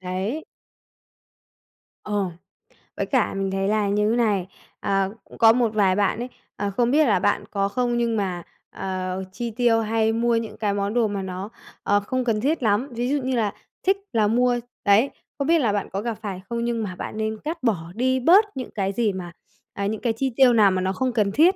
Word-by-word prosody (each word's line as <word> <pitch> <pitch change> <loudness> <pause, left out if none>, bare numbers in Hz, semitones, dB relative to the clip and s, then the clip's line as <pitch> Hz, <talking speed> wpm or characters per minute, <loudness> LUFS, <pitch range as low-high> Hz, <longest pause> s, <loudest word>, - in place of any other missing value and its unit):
đấy. 190 +11 -3 1.6
Ờ. 205 -2 -1 0.7
Với - - 0
cả 255 -6 +1
mình 195 0 -2
thấy 195 0 0
là 210 0 +1
như 210 +1 +2
thế - - +2
này, 205 -6 +1 0.3
à, 195 -1 +1
cũng - - -15
có 225 -1 +7
một 235 -2 +1
vài 195 -3 +3
bạn 205 +2 +1
ấy, 245 - -3 0.3
à, 205 - -2
không 235 +4 +1
biết 305 +2 +5
là 200 -5 +3
bạn 205 +2 +1
có 195 -1 +1
không? 240 +3 0
Nhưng 235 -1 +1
mà, 185 -4 -2 0.3
ờ, 185 0 -4
chi 235 +4 -4
tiêu, 235 0 +3
hay 220 0 +1
mua 235 +1 +2
những 230 -1 -3
cái 210 -2 0
món 200 +1 -1
đồ 235 -2 +3
mà 200 -1 -3
nó, 190 +2 -5 0.3
ờ, 205 0 +3
không 255 +5 -2
cần 225 -3 0
thiết 285 +2 0
lắm, 220 +5 +2
ví 240 +1 -2
dụ 285 0 +1
như 260 0 0
là 215 -4 0 0.3
thích 385 +1 +3 0.2
là 220 -2 +3
mua 245 +2 +2 0.3
đấy, 210 +6 +5 0.3
không 280 - -2
biết 335 0 +4
là 235 -7 +2
bạn 205 - -2
có 195 - -3
gặp 230 -1 -3
phải 195 -3 -5
không? 235 0 -2
Nhưng 235 -1 -1
mà 185 -3 -5
bạn 215 - -6
nên 220 0 -2
cắt 320 0 -4
bỏ 175 -9 0
đi 260 +3 +1
bớt 365 - +6
những 255 - -5
cái 195 -2 -1
gì 215 -1 +1
mà, 180 -2 -6 0.4
à, 200 - -3
những 215 +1 -2
cái 235 -2 +1
chi 260 +3 -2
tiêu 260 -2 +6
nào 210 -4 +5
mà 185 0 0
nó 190 +1 0
không 255 +6 0
cần 210 -4 +1
thiết. 330 - +5
220 Hz, 225 wpm, -24 LUFS, 200-240 Hz, 1.6 s, có